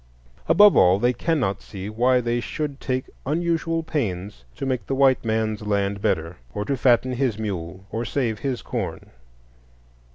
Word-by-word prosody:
Above 205 0 +7
all, 90 +1 +6
they 120 +4 +2
cannot 125 - 0
see 95 -1 -8
why 125 +4 +2
they 120 0 0
should 145 +3 -4
take 130 0 -2 0.2
unusual 165 +1 0
pains 100 - -3
to - - -4
make 130 -2 -2
the 135 - -1
white 135 -1 +4
man's 110 -1 -1
land 100 -1 -1
better, 80 -1 -1 0.2
or 105 - -2
to 140 - 0
fatten 125 0 +3
his 125 -4 0
mule, 95 -3 -5
or 115 - -2
save 120 -3 -1
his 135 -4 -3
corn. - - -5
120 Hz, 160 wpm, -23 LUFS, 100-135 Hz, 0.2 s, Above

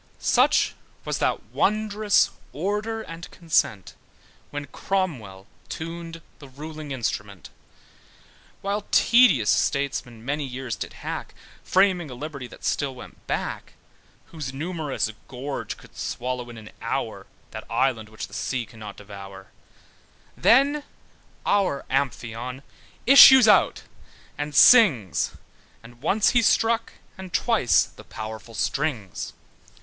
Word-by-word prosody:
Such - - +3 0.3
was - - -2
that - - 0
wondrous 210 0 +2 0.2
order 210 +7 -2
and 165 -1 -9
consent, 155 - 0 0.6
When 145 0 -5
Cromwell 135 - -3 0.2
tuned 165 0 -7 0.2
the 140 - -12
ruling 155 +2 -8
Instrument, 105 - -4 1.1
While 200 +1 -2
tedious 200 - +5
statesmen 125 -5 -1
many 145 +2 -1
years 130 -2 -5
did - - -6
hack, - - -5 0.3
Framing 185 -4 +2
a 125 - -8
liberty 140 -1 -7
that - - -12
still 140 -3 -1
went 125 - -13
back, - - -4 0.6
Whose 150 -5 -5
numerous 150 -5 -3 0.2
gorge 135 +2 -5
could - - -18
swallow 125 0 -4
in 120 - -10
an 110 -1 -11
hour - - -3 0.2
That - - -9
island, 115 -5 0
which 110 - -6
the - - -18
sea 125 -3 -2
cannot 105 -3 -10
devour: 100 -2 -11 0.8
Then 280 +5 +4 0.6
our 190 -9 +1
Amphion 125 -1 -2 0.4
issued 265 -2 +10
out 210 - +4 0.5
and 145 0 -5
sings, 140 - +6 0.5
And 120 +1 -15
once 200 +8 +3
he 240 - +4
struck, 230 +1 +2 0.3
and 190 -1 -8
twice, 220 - +3
the - - -13
powerful 110 +1 -8
strings. 130 - -2
140 Hz, 115 wpm, -24 LUFS, 120-190 Hz, 1.1 s, issued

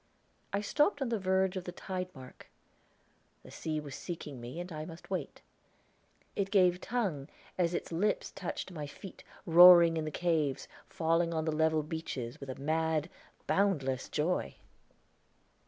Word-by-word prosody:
I 200 - 0
stopped 295 - +2
on 255 - -2
the 230 -2 0
verge 190 0 +1
of 185 -1 -4
the 180 - -5
tide 185 0 -5
mark; 130 -1 -13 0.9
the - - -13
sea 155 -1 -3
was 145 -2 -8
seeking 150 -5 -7
me 125 +7 -7
and 175 +1 -6
I 155 -1 -5
must 165 +3 -11
wait. 180 -7 -4 0.9
It 195 -1 -1
gave 180 -2 +4
tongue 190 - -2 0.3
as 175 -1 +1
its - - -4
lips 195 +6 0
touched 185 0 -5
my 150 -4 -5
feet, 185 +6 -11 0.2
roaring 170 -1 +9
in 155 - -2
the - - -2
caves, 155 -4 0 0.2
falling 165 -1 +1
on 160 -1 -1
the 160 - 0
level 160 0 +2
beaches 145 -6 -5
with 140 - -8
a 130 - -4
mad, 160 +2 0 0.3
boundless 145 -10 +1
joy! 160 +4 -1
165 Hz, 155 wpm, -32 LUFS, 155-185 Hz, 0.9 s, roaring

